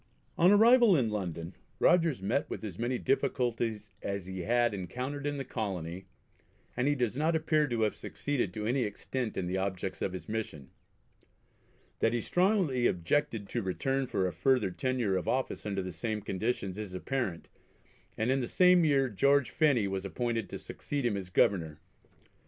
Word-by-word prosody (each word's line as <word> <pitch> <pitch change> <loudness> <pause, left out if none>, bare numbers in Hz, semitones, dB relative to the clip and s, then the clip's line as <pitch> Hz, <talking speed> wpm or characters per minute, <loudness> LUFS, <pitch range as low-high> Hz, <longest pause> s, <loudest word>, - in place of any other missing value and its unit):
On 175 - +5
arrival 225 -1 +6
in 115 -5 +1
London 90 -4 -4 0.2
Rogers 165 - +3
met 120 +8 0
with - - -5
as 100 -4 -6
many 120 +2 0
difficulties 120 -6 -1
as 100 -2 -3
he 95 0 -6
had 120 +5 +2
encountered 125 +10 -4
in 145 0 -2
the 135 - -4
Colony, 95 -6 -4 0.7
and 125 +2 0
he 145 - +3
does 120 -4 -1
not 155 +4 +1
appear 155 -1 +2
to 120 -3 -1
have 110 -1 +2
succeeded 140 -10 -3
to 105 +3 -5
any 125 +4 +1
extent 120 +2 -3
in 95 - -1
the 90 +2 -1
objects 95 -1 -3
of 95 - -1
his 95 - -7
mission. 105 -11 -5 1.3
That 115 - +2
he 120 - 0
strongly 180 - +2
objected 105 - 0
to 120 - -1
return 135 +8 -1
for 95 -6 0
a 90 - -4
further 105 +3 +2
tenure 120 -2 0
of 90 - -4
office 130 -4 -1
under 100 -2 -2
the 90 - -5
same 110 +2 -3
conditions 100 -1 -2
is 100 -4 -6
apparent, 100 -4 -3 0.7
and 110 +3 +1
in 135 0 +1
the 120 - -2
same 180 +2 +5
year 140 -4 +3
George 140 +4 +2
Phenney 140 -10 +3
was 95 -1 -3
appointed 115 +2 -2
to - - -5
succeed 145 -3 -4
him 115 -4 +1
as 95 -2 -5
Governor. 85 -5 +1
115 Hz, 175 wpm, -30 LUFS, 95-135 Hz, 1.3 s, arrival